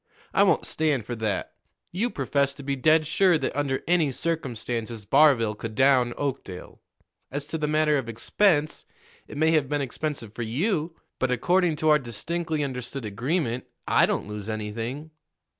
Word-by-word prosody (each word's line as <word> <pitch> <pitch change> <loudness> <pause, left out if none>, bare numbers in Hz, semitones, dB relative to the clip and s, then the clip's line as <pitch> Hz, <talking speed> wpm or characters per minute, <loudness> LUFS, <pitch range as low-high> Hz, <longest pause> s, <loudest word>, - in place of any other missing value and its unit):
I - - +4
won't - - +3
stand 150 -8 0
for 120 - -4
that. 110 -3 -2 0.4
You 215 +8 0
professed 140 - 0
to 140 - -9
be 140 0 -1
dead 155 +4 +4
sure 175 +3 +3
that - - -3
under 140 -2 -1
any 165 -5 +3
circumstances 120 -8 -3
Barville 135 -5 +4
could 110 +1 -7
down 130 -2 +3
Oakdale. 135 -10 -5 0.5
As 145 +2 -4
to 160 - -4
the 150 - 0
matter 150 -1 +2
of 120 -3 -6
expense, 155 - +1 0.4
it - - -9
may 160 +2 +3
have 150 -5 +2
been 145 0 0
expensive 135 -4 -4
for 120 - -6
you', 160 - -1 0.2
but, 130 - +1
according 175 +7 +2
to 155 +1 +1
our 150 0 +6
distinctly 155 +6 -3
understood 125 -1 -5
agreement, 125 - -2 0.2
I - - +4
don't - - -2
lose 105 0 -6
anything." 115 +8 -4
140 Hz, 165 wpm, -26 LUFS, 120-155 Hz, 0.5 s, our